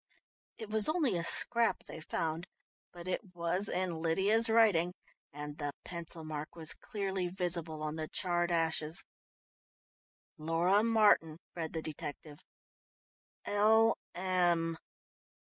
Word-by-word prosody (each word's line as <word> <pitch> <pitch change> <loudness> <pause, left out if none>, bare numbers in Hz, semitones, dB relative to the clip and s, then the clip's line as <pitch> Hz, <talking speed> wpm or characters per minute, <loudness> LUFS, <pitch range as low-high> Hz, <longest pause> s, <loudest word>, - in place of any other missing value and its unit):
It 220 -1 -8
was 220 +2 +2
only 310 - +1
a 170 - -1
scrap 235 +6 +3
they - - -9
found, 160 +2 -3 0.4
but 175 0 -10
it 185 0 -4
was 175 +4 -1
in 180 -3 -2
Lydia's 200 +8 +3
writing, 195 -6 +4 0.4
and 150 +1 -7
the 145 -1 -3
pencil 170 -2 -7
mark 155 0 -6
was 160 -2 -1
clearly 195 -4 -3
visible 170 -4 -2
on 155 +1 -3
the 155 -1 -3
charred 175 0 0
ashes. 160 -1 0 1.4
"'Laura 170 +6 +2
Martin,'" 210 -8 +4 0.2
read 165 -2 -4
the 160 -1 -3
detective. 150 0 -6 1.1
"'L.M. 185 -6 +2
175 Hz, 115 wpm, -33 LUFS, 160-200 Hz, 1.4 s, writing